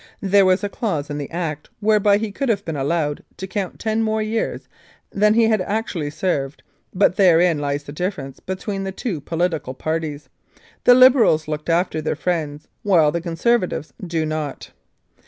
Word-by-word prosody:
There 195 0 +4
was 185 +2 +2
a - - +1
clause 170 - -3
in 145 - -3
the 140 - -5
Act 160 -4 -4
whereby 210 -1 +3
he 215 0 -3
could 270 +5 -2
have 200 -3 0
been 160 - -3
allowed 145 +1 -1
to 190 - -5
count 190 -1 -4
ten 220 0 -1
more 220 0 0
years 220 +1 -2 0.4
than 210 +1 +3
he 230 - +5
had 220 -3 +3
actually 195 -6 -2
served, 145 -4 -2 0.3
but 185 -1 +2
therein 175 -4 +4
lies 145 0 -2
the 145 - -9
difference 150 -5 -4
between 195 +1 -4
the 190 - -3
two 190 - -4
political 160 -4 -2
parties. 155 0 -3 0.6
The 245 - +8
Liberals 250 - +5
look 150 +1 -4
after 165 -1 +1
their 155 - -1
friends, 155 -3 -3
while 170 -7 +4
the 170 +2 -2
Conservatives 175 0 0
do 165 -3 -1
not. 155 -2 -4
175 Hz, 175 wpm, -21 LUFS, 155-205 Hz, 0.6 s, The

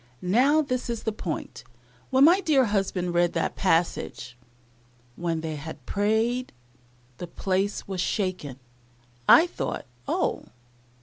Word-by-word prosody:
Now 265 +12 +3
this 255 -3 -3
is 235 -2 -3
the 220 - -1
point, 170 - -6 0.5
when 265 +1 +4
my 350 +6 +6
dear 290 -8 +3
husband 195 -4 -1
read 175 0 +2
that 165 - -1
passage, 165 -8 -1 0.8
"When 165 -2 -2
they 160 -1 -4
had 145 -3 -9
prayed, 220 +5 0 0.7
the 175 - -5
place 195 +3 -2
was 190 -2 -3
shaken," 180 - -2 0.7
I 325 - +9
thought, 355 - -4 0.2
Oh! - - -1
195 Hz, 125 wpm, -26 LUFS, 170-250 Hz, 0.8 s, I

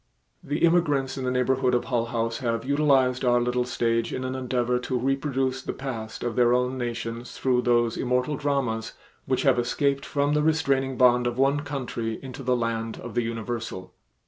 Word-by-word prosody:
The 145 +3 +1
immigrants 145 -6 +2
in 135 -1 -4
the - - +1
neighborhood 125 0 +2
of 120 - 0
Hull 120 -3 0
House 115 -1 -2
have 115 -3 -2
utilized 135 -3 +2
our 120 -1 +4
little 125 0 0
stage 115 -1 0
in 130 - -3
an 130 0 -3
endeavor 125 -1 0
to 125 +1 -2
reproduce 135 0 -1
the - - -4
past 115 -5 -6
of 120 -2 -2
their 120 0 +4
own 125 +1 0
nations 120 -1 -4
through 125 -2 +2
those 120 -2 +2
immortal 125 +3 0
dramas 135 -6 -1 0.3
which - - +1
have - - +4
escaped 140 +3 0
from 145 0 0
the 150 - +2
restraining 135 -4 +1
bond 125 -1 +4
of 120 0 -3
one 135 +2 +3
country 125 -6 -4
into 135 +1 -8
the 125 -1 +1
land 115 -1 -2
of - - -8
the 120 - +1
universal. 115 -5 -5
125 Hz, 185 wpm, -26 LUFS, 120-135 Hz, 0.3 s, our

